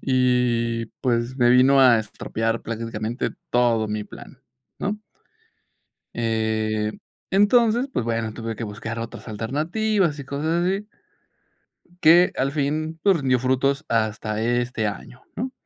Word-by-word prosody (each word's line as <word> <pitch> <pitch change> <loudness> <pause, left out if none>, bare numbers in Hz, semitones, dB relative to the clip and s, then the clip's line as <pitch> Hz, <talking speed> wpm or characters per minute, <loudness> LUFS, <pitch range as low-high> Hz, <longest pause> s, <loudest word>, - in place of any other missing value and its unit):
y, 125 -3 +1 0.2
pues, 120 0 0
me 120 -2 +4
vino 130 +2 +6
a 125 -3 +6
estropear 115 +1 -3
prácticamente 115 +1 -3 0.2
todo 115 -3 +2
mi 105 0 -3
plan, - - -13 0.4
¿no? 205 +1 -2 1.2
Eh, 110 -2 -1 0.4
entonces, 230 +5 +3
pues 120 - -1
bueno, 115 -1 -2
tuve 115 0 -5
que 115 - -4
buscar 110 +2 -6
otras 115 +1 -7
alternativas 155 - -1
y 140 - -6
cosas 160 +5 -1
así. 195 +3 -1 1.1
Que 170 +3 +6
al 135 +1 0
fin, 155 +2 -2
pues, 195 -3 +4
rindió 130 -3 +2
frutos 135 +3 0
hasta 110 -1 -1
este 120 -1 0
año, 120 +4 -7
¿no? 255 +3 -4
125 Hz, 125 wpm, -23 LUFS, 115-155 Hz, 1.2 s, vino